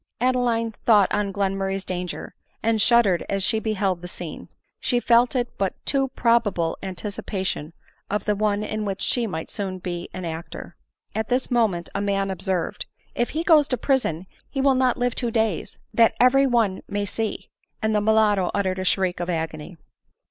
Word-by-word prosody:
Adeline 240 -2 +1 0.2
thought 210 -4 +5
on 205 -1 0
Glenmurray's 195 -1 -1
danger, 180 -1 -5 0.3
and 225 -1 +2
shud 235 +1 +5
dered 180 -3 +2
as 195 -1 0
she 220 +3 +1
beheld 195 -5 -1
the 180 - -6
scene; 175 -2 -8 0.3
she 245 - +1
felt 240 +2 +4
it 245 -1 -1
but 195 -1 +1
a - - -42
too 270 -1 +1
pro 235 -1 +4
bable 170 -7 -2
anticipation 190 -3 -4 0.4
of 210 +1 -1
the 210 - +2
one 210 0 +1
in 215 0 -3
which 195 -1 -3
she 235 +3 0
might 160 -5 -5
soon 190 -2 -3
be 175 -1 -5
an 185 -1 -6
actor. 165 +1 -7 0.4
At 220 0 -2
this 255 +1 0
moment 215 -8 +1
a 200 - -1
man 195 -1 0
observed, 190 -2 -2
" - - -37
If 240 - 0
he 320 +2 -2
goes 310 -5 +5
to 250 - -1
prison 220 - 0 0.2
he 275 - -4
will 270 0 +4
not 255 -1 +2
live 245 -1 0
two 240 -2 -2
days, 220 -5 -1 0.2
that 230 -1 +4
every 270 +2 +5
one 225 -7 +1
may 205 0 -2
see 220 +2 -4
;" - - -52
and 220 0 +2
the 210 - +2
mulatto 210 -3 +3
uttered 190 -2 0
a - - -1
shriek 185 -1 +1
of 175 0 -3
agony. 160 0 -4
205 Hz, 190 wpm, -24 LUFS, 185-235 Hz, 0.4 s, thought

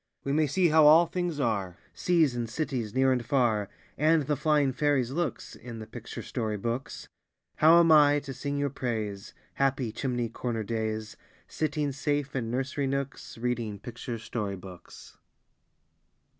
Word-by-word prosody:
We 140 - -1
may 155 0 +3
see 175 +5 +2
how 155 0 +6
all 160 +3 +8
things 175 -2 -3
are, 100 -8 -1 0.2
Seas 165 -7 +2
and 120 -2 -3
cities, 125 -5 -3
near 130 0 +4
and 125 -2 0
far, 115 -6 +1 0.3
And 155 +1 +4
the 150 +2 0
flying 145 -2 +2
fairies' 135 -3 +1
looks, 160 -3 -3
In 120 -1 -9
the 110 - -7
picture 115 +1 -8
story 110 -4 -3
books. 120 +5 -4 0.5
How 165 +2 +7
am 165 -1 +5
I 145 -1 +6
to 140 -1 -7
sing 140 +3 -3
your 140 -1 0
praise, 110 -7 -4 0.2
Happy 135 -4 0
chimney 120 0 -2
corner 115 -1 -3
days, 110 0 -3 0.3
Sitting 150 -2 -1
safe 140 0 -2
in 115 -4 -2
nursery 135 +3 -2
nooks, 140 -2 -4
Reading 115 -3 -2
picture 120 +2 -6
story 105 -3 -4
books? 90 -2 -13
130 Hz, 155 wpm, -28 LUFS, 115-145 Hz, 0.5 s, all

